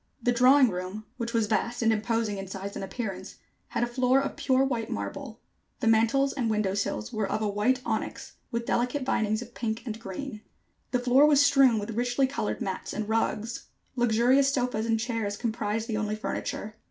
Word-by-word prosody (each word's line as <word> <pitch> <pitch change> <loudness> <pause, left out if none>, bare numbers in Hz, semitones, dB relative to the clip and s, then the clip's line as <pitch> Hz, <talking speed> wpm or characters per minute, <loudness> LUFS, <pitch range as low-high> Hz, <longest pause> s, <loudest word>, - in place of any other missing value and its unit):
The 245 - +1
drawing 255 +2 +6
room, 185 +4 -5
which 235 -2 -3
was 230 -2 +2
vast 235 +3 -1
and 225 0 +4
imposing 220 -1 -1
in 195 - -6
size 195 +1 -6
and - - -4
appearance, 195 -3 -5 0.3
had - - -1
a - - +4
floor 250 +2 +2
of 275 - -3
pure 260 0 +2
white 240 -5 -1
marble. 100 - -5 0.4
The - - -2
mantels 230 +5 +3
and 245 -5 -1
window 210 -3 +1
sills 150 - -2
were 210 -2 -1
of 215 - -1
white 250 +5 +1
onyx, - - -3 0.2
with 235 0 -3
delicate 250 +4 0
vinings 215 -2 0
of 240 0 -15
pink 225 0 -3
and 225 -2 -5
green. 215 +3 -6 0.5
The 250 - +1
floor 255 +4 +5
was 285 -1 +5
strewn 270 -5 +5
with 210 +1 -3
richly 245 +4 +1
colored 260 -5 -3
mats 190 -1 -4
and 215 0 -3
rugs. 225 +1 -1 0.3
Luxurious 245 +3 +3
sofas 245 -4 -1
and 225 -1 +2
chairs 225 -3 -2
comprised 220 -1 -2
the 220 -3 -1
only 215 -1 -1
furniture. 215 0 -4
230 Hz, 190 wpm, -27 LUFS, 215-250 Hz, 0.5 s, drawing